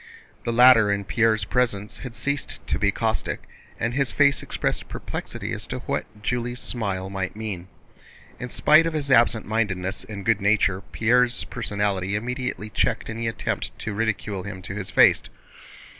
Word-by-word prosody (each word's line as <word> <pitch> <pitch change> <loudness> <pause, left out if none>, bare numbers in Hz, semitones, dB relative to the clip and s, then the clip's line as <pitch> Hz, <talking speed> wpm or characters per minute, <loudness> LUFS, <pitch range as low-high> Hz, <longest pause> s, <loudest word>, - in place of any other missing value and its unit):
The 120 - 0
latter 115 -3 +7
in 100 0 -1
Pierre's 110 -2 +2
presence 105 -3 -1
had 125 -3 -8
ceased 140 +6 -3
to - - -1
be - - +3
caustic, - - -1 0.4
and 115 +1 -1
his 135 -2 +1
face 140 +3 +3
expressed - - -2
perplexity - - -5
as - - -5
to - - -4
what 105 - -4
Julie's 120 +1 -2
smile 100 -6 -2
might 95 -1 -3
mean. 105 -5 -5 0.7
In 125 - -5
spite 155 +6 +5
of 165 - -2
his 145 -3 -2
absent 115 -2 +4
mindedness 100 -4 -1
and 100 -3 -8
good 110 -2 +2
nature, 100 -2 +2
Pierre's 125 +2 +2
personality 100 -4 -2
immediately 125 -1 -3
checked 115 -1 0
any 115 +1 -3
attempt 115 - -3
to 110 - -4
ridicule 105 -2 -1
him 95 -1 -7
to 95 - -6
his 100 -2 -5
face. - - +6
110 Hz, 160 wpm, -24 LUFS, 100-125 Hz, 0.7 s, latter